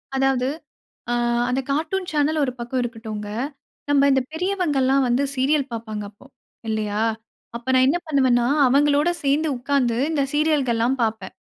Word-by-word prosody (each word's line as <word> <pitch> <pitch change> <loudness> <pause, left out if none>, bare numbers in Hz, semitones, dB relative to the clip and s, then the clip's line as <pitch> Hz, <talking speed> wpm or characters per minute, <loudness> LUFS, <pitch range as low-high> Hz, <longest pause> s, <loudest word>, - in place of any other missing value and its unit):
அதாவது 265 -1 +1 0.6
ஆ, - - +1 0.4
அந்த 250 +1 0
cartoon 330 +6 -1
channel 305 +1 +1
1 260 - 0
பக்கம் 240 +2 -3
இருக்கட்டுங்க. 220 -3 -6 0.6
நம்ப 285 -1 +4
இந்த 265 -1 +3
பெரியவர்கள்லாம் 310 -7 +1
வந்து 245 +3 +1
சீரியல் 275 +1 +1
பார்ப்பாங்க 220 -2 -5
அப்போ 205 +5 -20 0.4
இல்லையா? 215 -1 -1 0.6
அப்போ 235 +2 -8
நான் 255 - +5
என்ன 330 +6 +2
பண்ணுவேன்னா, 260 -5 +2 0.2
அவங்களோட 290 +4 +3
சேர்ந்து 290 +3 +1
உட்கார்ந்து 250 -2 0
இந்த 295 -3 +1
சீரியல்கள்லாம் 270 -5 +1
பார்ப்பேன். 220 -4 -3
265 Hz, 135 wpm, -22 LUFS, 235-295 Hz, 0.6 s, நான்